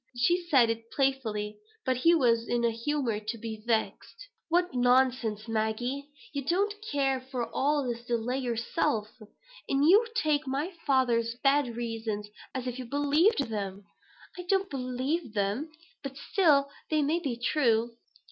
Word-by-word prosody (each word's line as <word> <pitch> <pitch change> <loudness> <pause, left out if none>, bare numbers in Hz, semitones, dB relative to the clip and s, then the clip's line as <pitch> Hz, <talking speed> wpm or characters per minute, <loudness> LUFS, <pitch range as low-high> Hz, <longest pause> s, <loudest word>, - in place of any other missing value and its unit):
She 345 +8 +2
said 245 -6 +5
it 230 0 -6
playfully, 225 -7 -1 0.3
but 260 -2 +1
he 335 +7 +5
was 235 -6 +2
in 240 0 0
a 230 - +3
humor 235 -1 -1
to 215 +2 -5
be 220 -1 -6
vexed. 240 - -2 0.2
"What 350 0 +2
nonsense, 245 -3 +2
Maggie! 230 +6 -2 0.2
You 280 -1 -2
don't 390 +8 +1 0.2
care 270 -2 +1
for 255 -2 -4
all 290 +1 +1
this 235 -2 -4
delay 240 +2 -1
yourself; 230 -3 -1 0.6
and 275 +1 +2
you 420 +7 +6
take 305 -10 +2
up 300 - -18
my 290 +8 -2
father's 235 -4 +2
bad 275 -4 +3
reasons 225 -3 -3 0.3
as 255 -1 -3
if 250 0 -4
you 255 - -5
believed 290 - +2
them." 200 -2 -4 0.6
"I - - -2
don't 390 0 +1
believe 255 +1 -2
them; 205 +10 -1 0.3
but 275 -1 -7
still 295 -9 +3 0.2
they 310 -1 +2
may 315 +4 +1
be 270 -8 -3
true." 235 -3 +2
255 Hz, 155 wpm, -29 LUFS, 230-290 Hz, 0.6 s, you